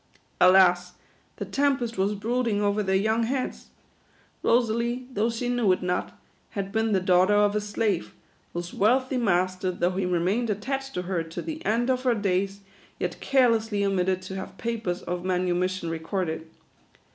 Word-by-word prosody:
Alas, 180 -1 +5 0.4
the - - -5
tempest 270 -5 0
was 195 +2 0
brooding 230 0 0
over 205 0 +1
their 190 -1 0
young 220 +4 +2
heads. 255 +3 -2 0.7
Rosalie, 235 +1 +1
though 220 +2 +1
she 235 +1 -3
knew 245 -5 +2
it 185 - -3
not, 180 0 -2 0.4
had 195 0 -3
been 220 +1 0
the 195 - +3
daughter 185 +2 +4
of 205 0 +3
a 210 - +1
slave, 205 -3 -2 0.4
whose 175 0 -5
wealthy 255 +5 +2
master, 185 -4 +1
though 175 0 0
he 190 -1 0
remained 185 +7 0
attached 270 +6 -3
to 180 - -2
her 180 -2 -1
to 165 - -6
the 320 0 -6
end 240 +4 +2
of 255 -1 0
her 250 -2 +2
days, 195 -1 -1 0.4
yet - - -3
carelessly 225 -6 +2
omitted 185 -1 0
to 190 +1 -7
have 190 0 -7
papers 225 -6 -3
of 175 0 -4
manu 180 -1 0
mission 185 0 -1
recorded. 165 0 -3
200 Hz, 165 wpm, -26 LUFS, 185-230 Hz, 0.7 s, Alas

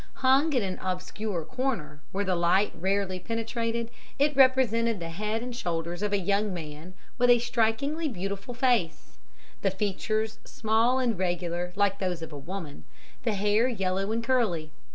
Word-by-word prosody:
Hung 270 +4 +4
in 250 -5 +2
an 185 -1 -3
obscure 185 -1 -3
corner, 230 - -3
where 200 +1 -1
the 190 - +1
light 175 +4 +3
rarely 190 +1 -1
penetrated, 230 +2 -2 0.3
it 290 +1 +2
represented 235 -5 +4
the 165 -1 -5
head 215 +6 -2
and 245 -1 -5
shoulders 170 -4 -3
of 210 -1 0
a 205 - +3
young 200 +2 +1
man 165 +1 -7 0.2
with 245 0 +4
a 245 - +8
strikingly 240 +7 0
beautiful 200 0 -4
face 230 - 0 0.4
the 195 - +2
features 215 +3 -1
small 225 +3 +2
and 240 -7 0
regular 175 -1 -1
like 200 0 +2
those 180 -3 -2
of 160 -1 -8
a - - -6
woman 160 -1 -7 0.4
the 225 -3 +1
hair 210 +4 +3
yellow 195 -3 -1
and 230 +1 -1
curly. 215 -11 +1
205 Hz, 160 wpm, -28 LUFS, 180-235 Hz, 0.4 s, a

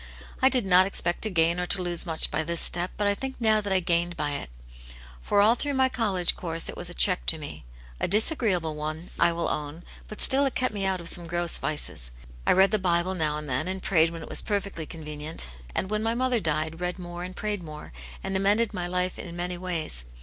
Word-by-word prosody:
I 260 - +6
did 255 -5 +2
not 185 0 +6
expect 175 -3 0
to 220 - +2
gain 170 -1 +2
or 180 - -2
to 200 - +6
lose 175 0 0
much 160 -1 +1
by - - 0
this 170 +1 0
step, 175 +1 +4
but 210 - -1
I 205 - +3
think 265 +6 -5
now 220 -2 +3
that 200 -1 -4
I 190 - +4
gained 175 0 0
by 150 -1 -1
it. 140 - -5 0.7
For 200 - +2
all 215 +3 +5
through 285 +3 -3
my 260 0 +3
college 200 -8 0
course 165 -2 -2
it - - -6
was 175 - -2
a 175 - -6
check 180 -2 +3
to 160 - +4
me; 145 - -9 0.3
a - - 0
disagreeable 200 - +1
one, 155 +3 -5
I 170 0 +4
will 170 0 -2
own; 150 +3 -4 0.2
but 215 - -9
still 270 +1 +4
it 270 - -5
kept 255 -3 0
me 200 -2 -2
out 190 -2 -1
of 170 - -1
some 175 -1 +1
gross 175 0 +1
vices. 150 - -1 0.4
I - - +6
read 190 +1 +5
the 215 - +2
Bible 175 0 +1
now 155 -4 0
and 150 0 -5
then, 130 +5 -1
and 190 0 -3
prayed 165 -3 +3
when 165 -1 -7
it - - -10
was - - +3
perfectly 200 -6 -3
con 160 -3 -9
venient; 150 +1 -5 0.3
and 190 - -1
when 215 0 0
my 225 +1 0
mother 255 -1 +1
died, 160 -1 -1
read 180 +1 -3
more 175 -1 -7
and 185 +1 -7
prayed 210 -2 -3
more, 150 - -10 0.3
and 195 - -3
amended 205 +4 +2
my 180 -2 -3
life 180 +1 -1
in 170 -1 -7
many 180 +1 -3
ways. 165 - -2
180 Hz, 245 wpm, -26 LUFS, 165-200 Hz, 0.7 s, I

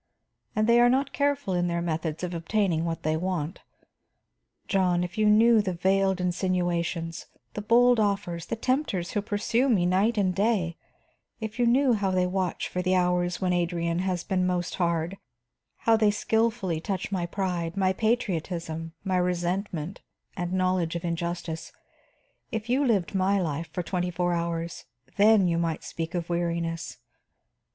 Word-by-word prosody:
And 215 - +2
they 235 +1 +5
are 240 0 +6
not 270 +2 +1
careful 285 -8 0
in 175 0 +1
their 170 0 -1
methods 165 -1 -3
of 180 0 -3
obtaining 170 -1 0
what 165 -1 -3
they 155 +1 +1
want. 175 -1 -2 1.1
John, 180 -2 +2
if 180 +2 -5
you 215 -1 +2
knew 220 +1 +6
the 190 -3 -2
veiled 190 +1 +2
insinuations, 175 -2 -1 0.3
the 210 - -4
bold 240 +3 +4
offers, 195 -5 -1
the - - -2
tempters 230 - -1
who 205 - 0
pursue 230 +5 0
me 195 -8 +3
night 195 +6 +2
and 190 -3 +2
day; 195 -4 +1 0.6
if 220 +1 -6
you 240 - +3
knew 255 +2 +4
how 200 -3 0
they 185 -1 +2
watch 180 -1 -1
for 180 - -3
the 185 +1 +1
hours 180 0 +1
when 180 -1 +1
Adrian 170 -1 0
has 185 -2 -1
been 185 -1 0
most 180 -1 -1
hard, 170 +2 0 0.7
how 225 - +6
they 215 -1 +4
skilfully 215 -5 0
touch 190 +2 -3
my 180 -3 -1
pride, 175 -2 -2
my 190 -1 +2
patriotism, 170 -7 -2
my 190 -2 0
resentment 180 -1 -2 0.3
and 175 -2 -3
knowledge 185 -2 0
of 170 +1 -4
injustice, 170 -1 -3 0.8
if 225 0 -4
you 270 +3 +3
lived 205 -10 +1
my 195 +1 +2
life 165 -2 -3
for 180 - -3
twenty 180 +1 -2
four 175 0 0
hours, 170 -1 -3 0.3
then 205 -2 +5
you 170 -1 +1
might 165 -2 -2
speak 165 +1 -5
of 170 -1 -2
weariness. 170 -1 -2
180 Hz, 160 wpm, -27 LUFS, 170-205 Hz, 1.1 s, are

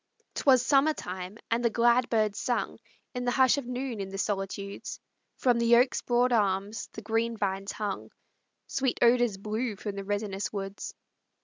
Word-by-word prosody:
'Twas 255 -3 +4
summer 285 +3 +4
time, 185 +3 -6
and 235 +1 +1
the 235 - +4
glad 240 +2 +3
birds 215 -3 +1
sung 245 -2 -1 0.3
In 250 -1 -3
the 245 - +1
hush 260 +2 +4
of 260 - -8
noon 250 -2 -3
in 195 -1 -4
the 195 - -6
solitudes; 200 0 -3 0.4
From 245 -2 +2
the 235 0 +5
oak's 250 +2 +3
broad 245 +1 +2
arms 200 -1 0
the 220 - -8
green 225 +2 0
vines 195 -1 -2
hung; 205 -2 -4 0.6
Sweet 265 -2 -1
odors 240 -3 +4
blew 215 +3 -2
from 205 +1 -5
the 200 - -4
resinous 205 0 -2
woods. 195 -1 -5
225 Hz, 170 wpm, -28 LUFS, 200-245 Hz, 0.6 s, the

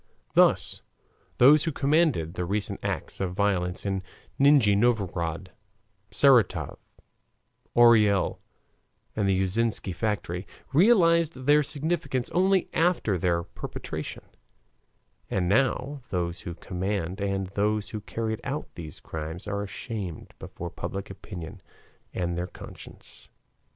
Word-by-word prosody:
Thus - - +3 0.6
those 145 +4 +7
who 165 - 0
commanded 145 - +2
the 90 - -3
recent 100 +4 -2
acts - - -4
of 90 -1 -2
violence 95 -3 0
in 95 -1 -1 0.4
Nijni 135 -7 +6
Novgorod, 95 -6 0 0.6
Saratov, 115 - +3 1.0
Orel, 110 -5 +5 0.8
and 100 -2 +1
the 95 -1 +2
Yuzovsky 100 0 0
factory 100 -2 -2 0.3
realized 170 - +5
their 150 +1 +6
significance 140 -4 -2
only 190 +1 +3
after 160 - +1
their 85 -1 +1
perpetration, - - -7 1.1
and 90 -2 0
now 135 +5 +1
those 85 -2 -2
who 85 - -6
commanded 95 +1 -3
and 95 0 -1
those 105 +1 0
who 110 - -5
carried 110 +1 -3
out 145 +2 -4
these 80 -3 -9
crimes 80 +2 -6
are 100 0 -2
ashamed 100 -3 -6
before 85 0 -7
public 100 0 -5
opinion 90 -4 -9 0.5
and 85 -1 -2
their 90 +1 -2
conscience. - - -13
100 Hz, 115 wpm, -27 LUFS, 90-135 Hz, 1.1 s, those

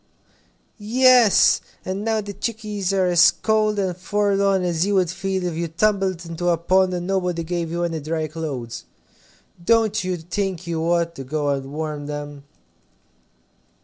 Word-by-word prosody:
"Yes. 245 0 +5 0.2
And 190 +2 -3
now 220 -1 0
the 205 0 -7
chickies 210 -2 -3
are 190 -1 +2
as 175 -2 +6
cold 215 -1 0
and 190 -3 -1
forlorn 200 0 +1
as 170 -2 0
you 200 +1 0
would 180 -3 +2
feel 190 0 -3
if 175 - -2
you 170 +1 -2
tumbled 190 0 0
into 170 +1 -2
a 170 - +2
pond 185 +2 +2
and 175 0 -4
nobody 180 -3 -1
gave 170 0 -3
you 170 +1 -2
any 165 -2 -2
dry 155 +1 -2
clothes. 145 -7 -6 0.8
Don't 220 0 +2
you 185 -1 -2
think 180 +1 -3
you 165 -1 -2
ought 170 0 +1
to 135 - -8
go 145 +2 -2
and 135 -1 -2
warm 150 -1 -4
them?" 145 -1 -7
180 Hz, 160 wpm, -22 LUFS, 165-200 Hz, 0.8 s, as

